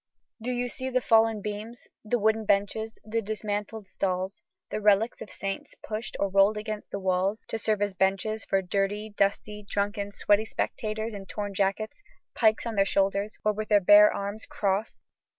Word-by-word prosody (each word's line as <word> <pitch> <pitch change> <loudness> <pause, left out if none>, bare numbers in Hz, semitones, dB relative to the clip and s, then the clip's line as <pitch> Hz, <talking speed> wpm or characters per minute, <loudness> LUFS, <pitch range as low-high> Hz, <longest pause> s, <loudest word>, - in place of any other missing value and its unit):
Do 240 - -3
you 245 0 -1
see 260 +2 -4
the 255 0 +2
fallen 225 -3 +3
beams, 215 +3 -6 0.2
the 230 +2 +1
wooden 220 0 +2
benches, 215 +2 0
the 225 +1 -1
dismantled 210 0 -4
stalls, 185 +1 -2 0.3
the 215 - -2
relics 210 +2 +3
of - - -7
saints 195 +1 -5
pushed 220 +1 -4
or 200 - +2
rolled 195 +2 +4
against 215 0 -5
the - - -4
walls 190 +3 0
to 225 - -2
serve 215 -1 +1
as 205 -1 -1
benches 195 +3 0
for 195 -1 0
"dirty, 200 +3 -1
dusty, 210 +1 0
drunken, 200 0 -2
sweaty 205 +1 +2
spectators 220 0 -3
in 195 -1 -8
torn 205 -1 -4
jackets, 200 - -1 0.3
pikes 220 -1 +3
on 230 - -2
their 200 -2 +4
shoulders, 200 +1 0
or 215 - +3
with 215 +1 -5
their 210 -1 +6
bare 205 +2 +8
arms 200 +2 -5
crossed"? 200 +2 -1
210 Hz, 175 wpm, -27 LUFS, 200-220 Hz, 0.3 s, bare